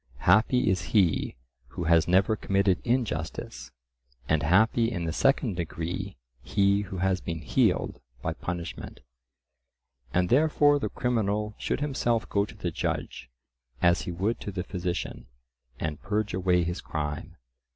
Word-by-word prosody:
Happy 110 +7 +4
is 95 -2 +2 0.2
he 90 -7 +2 0.3
who 85 - -5
has 80 -1 +4
never 95 +5 +3
committed 100 -3 +1
injustice, 105 - -2 0.6
and 80 -1 +2
happy 110 +8 +3
in 85 -6 -3
the 80 - -2
second 135 - +2
degree 85 +3 -4 0.2
he 100 0 +2
who 95 -1 -6
has 95 0 +1
been 85 -1 -4
healed - - +1 0.2
by - - -1
punishment. 85 -1 -6 1.1
And 90 +3 +1
therefore 145 +1 +4
the - - -2
criminal 105 -3 -1
should - - -2
himself 120 -5 0
go 100 0 +2
to - - -12
the - - -3
judge 65 - -3 0.5
as 85 0 +3
he - - -4
would 100 +7 -1
to 100 - -5
the 95 -2 -3
physician, 90 -2 -4 0.5
and 80 -2 -3
purge 105 0 -1
away 90 -1 +2
his 85 +2 -3
crime. 75 -2 -4
95 Hz, 140 wpm, -27 LUFS, 85-110 Hz, 1.1 s, Happy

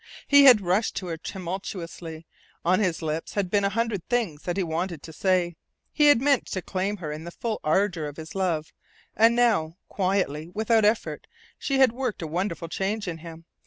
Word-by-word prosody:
He 285 -1 +7
had 245 -6 +8
rushed 190 +4 0
to 190 - -4
her 165 - -3
tumultuously. 170 -3 -6 0.4
On 185 +3 +3
his 180 -6 0
lips 155 +1 -3
had 195 -3 -1
been 205 -1 +2
a 200 - +2
hundred 220 -3 -1
things 220 -12 0
that 175 +1 -3
he - - +1
had 180 - -2
wanted 165 -1 -3
to 160 - -10
say. 180 -1 +1 0.4
He 295 -1 +4
had 290 -5 +7
meant 275 0 +2
to 185 - -4
claim 195 +2 -2
her 160 -5 -5
in 155 +1 -6
the 170 - -6
full 220 +5 -4
ardour 170 -1 +1
of 145 - -9
his 160 0 -8
love 170 -5 -1 0.4
and 230 +2 +5
now, 205 -9 +2
quietly, 185 -5 -1
without 220 0 +3
effort, 215 +2 0 0.3
she 275 - 0
had 265 -3 +6
worked 245 -6 -3
a - - -2
wonderful 170 +1 -3
change 195 +5 -2
in 165 -2 -4
him. 165 0 -11
185 Hz, 200 wpm, -26 LUFS, 165-215 Hz, 0.4 s, had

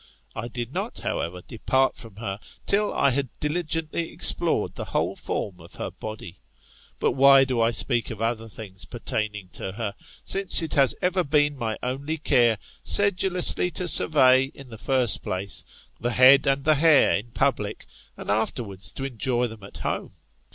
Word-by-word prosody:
I 120 - -5
did 120 +1 -7
not, - - -4
however, 90 +2 -4
depart 130 +4 0
from 115 -5 -10
her, 100 -2 -6 0.3
till 205 +1 0
I 140 - +1
had 135 0 -2
diligently 165 +1 -3
explored - - +2
the - - -7
whole - - -2
form 95 -3 -5
of 85 +1 -15
her - - -6
body. 110 -5 -9 0.6
But - - 0
why 135 0 +6
do 130 -3 -1
I 115 - +3
speak 120 0 +1
of 115 - -8
other 115 0 -3
things 100 -3 -10
pertaining 105 -4 -5
to 95 - -7
her; 105 -2 -5 0.3
since 195 -3 +6
it 160 - -5
has 135 -2 +3
ever 180 0 +1
been 145 -1 +1
my 115 -4 -4
ottfy 140 +5 -4
care, 120 -3 +3 0.3
sedulously 185 -3 +4
to 180 - -2
survey, 130 -6 +5
in 135 -2 -13
the 110 -2 -11
first 130 -4 0
place, 95 0 -4
the 120 - -2
head 130 +4 +6
and 135 0 0
file 155 - +5
hair 155 0 +4
in 105 +4 -5
public, 115 -4 -2 0.3
and - - -5
afterwards 105 -2 -1
to 135 - -7
enjoy 125 -1 -1
them 110 -2 -8
at 100 - -12
home - - -4
125 Hz, 170 wpm, -24 LUFS, 110-145 Hz, 0.6 s, why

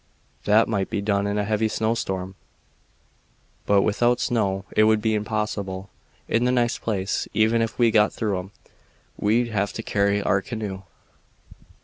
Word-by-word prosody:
That 110 +2 +4
might 100 -4 -1
be - - -2
done 100 0 0
in 100 0 -1
a 105 - +1
heavy 110 +1 0
snowstorm, 95 -4 -2 1.3
but 100 -1 +4
without 120 +3 +2
snow 100 -6 0
it 110 - +5
would 110 0 +4
be 110 0 0
impossible. 105 -3 -3 0.4
In 115 - +1
the 125 - +2
next 120 -2 +1
place, 100 -3 -2
even 110 +1 +3
if 115 - -2
we 120 -2 +4
got 105 -1 +4
through 105 -4 -2
'em, 95 +2 -9 0.7
we'd 115 +3 +1
have 100 -2 -1
to 115 - -5
carry 100 -1 +1
our 95 -1 +1
canoe." 105 -4 -5
105 Hz, 155 wpm, -24 LUFS, 100-115 Hz, 1.3 s, it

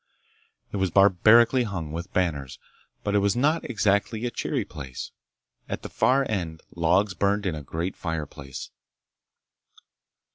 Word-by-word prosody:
It - - -3
was 95 -1 +1
barbarically 110 +7 +5
hung 90 -9 -3
with 85 +4 -6
banners, 70 -8 -1 0.5
but 105 - -1
it 105 - +4
was 100 +2 +2
not 150 +6 +1
exactly 110 0 +1
a 120 - -1
cheery - - -2
place. 65 -3 -7 0.6
At - - -4
the - - -6
far 130 +5 +2
end 85 -6 -3
logs 90 +4 +2
burned 100 +3 +1
in 90 - 0
a 75 - -5
great 85 +6 -4
fireplace. 75 -5 -6
95 Hz, 140 wpm, -26 LUFS, 80-110 Hz, 0.6 s, barbarically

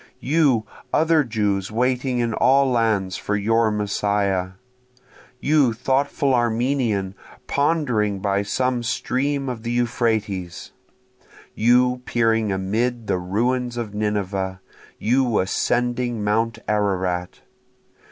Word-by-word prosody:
You 135 -6 +2 0.3
other 160 -1 +3
Jews 105 -5 -1
waiting 125 +2 0
in 120 -2 0
all 135 +3 +3
lands 105 -6 +1
for 105 - -2
your 115 +2 +2
Messiah! 100 -3 -1 0.9
You 145 -5 +3
thoughtful 135 +3 0
Armenian 120 -4 0 0.3
pondering 135 -9 +1
by 100 +1 0
some 125 +4 -1
stream 135 +3 -1
of 125 -3 -4
the 115 - -5
Euphrates! 110 -6 -1 0.8
you 125 +2 +3
peering 115 -3 +1
amid 110 +5 -1
the 90 - 0
ruins 120 +7 -1
of 110 -4 -4
Nineveh! 100 -3 -2 0.4
you 120 0 +1
ascending 120 +4 0
mount 110 +2 0
Ararat! 95 -4 -1
115 Hz, 105 wpm, -22 LUFS, 100-125 Hz, 0.9 s, other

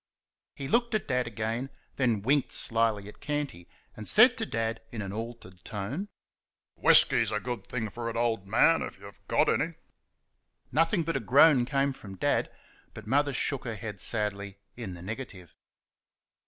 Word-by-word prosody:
He 135 - -5
looked 235 - +1
at 215 - -2
Dad 125 -2 0
again; 115 +4 -3 0.3
then 120 -6 +1
winked 140 +3 +2
slyly 115 -3 +1
at 105 - -12
Canty, 145 - -4 0.3
and 110 - -7
said 245 +3 +7
to 220 - -1
Dad, 115 0 -2
in 115 - -6
an 100 -2 -4
altered 110 -5 -8
tone: 120 - -5 0.7
"Whisky's 115 -2 +5
a 105 - 0
good 120 +1 -5
thing 115 -3 -3
for 115 +2 -4
it, 115 - -6
old 115 -4 0
man, 145 +10 +4
if - - -6
you've 100 0 -13
got - - +3
any." - - 0 1.0
Nothing 165 +5 +2
but 165 -2 -1
a - - -2
groan 135 +3 +5
came 140 +1 0
from 100 -6 -11
Dad, - - +1 0.5
but 110 - -9
Mother 140 +5 +2
shook 135 0 0
her 115 -3 -4
head 105 -2 -7
sadly 100 -3 -1 0.2
in 110 -7 -6
the 85 - -10
negative. 105 -4 -7
115 Hz, 170 wpm, -28 LUFS, 105-135 Hz, 1.0 s, said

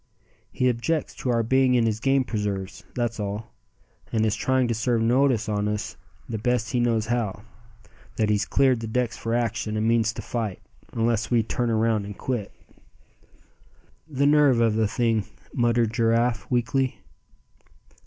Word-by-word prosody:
He 125 - +1
objects 125 +6 -1
to 130 - -3
our 115 -1 +2
being 130 +2 +3
in 120 -2 +3
his 110 -1 0
game 135 +2 +2
preserves, 105 -4 -4
that's 120 -2 -2
all, 105 +2 -5 0.6
and 110 -1 +1
is 110 -1 +1
trying 130 +2 +1
to 120 - 0
serve 115 0 0
notice 125 -1 +2
on 105 -1 0
us 105 0 -3 0.3
the 110 -2 -4
best 125 0 0
he 125 - +1
knows 115 -2 +1
how, 110 -3 -2 0.7
that 110 -2 +1
he's 105 0 +2
cleared 130 -3 +3
the 115 - -5
decks 125 +2 -1
for 115 +1 -2
action, 115 -2 -1
and 110 +1 0
means 115 -1 +3
to - - -7
fight, 110 -6 -3 0.3
unless 115 -1 0
we 120 -2 +3
turn 120 +2 -1
around 110 -2 +1
and 100 -1 -8
quit." 120 -6 -3 1.6
"The 140 -2 0
nerve 145 -4 +5
of 115 -2 +3
the 110 0 +2
thing!" 115 -1 0 0.3
muttered 120 -2 +1
Giraffe, 115 0 +1
weakly. 130 +2 0
115 Hz, 165 wpm, -25 LUFS, 110-125 Hz, 1.6 s, nerve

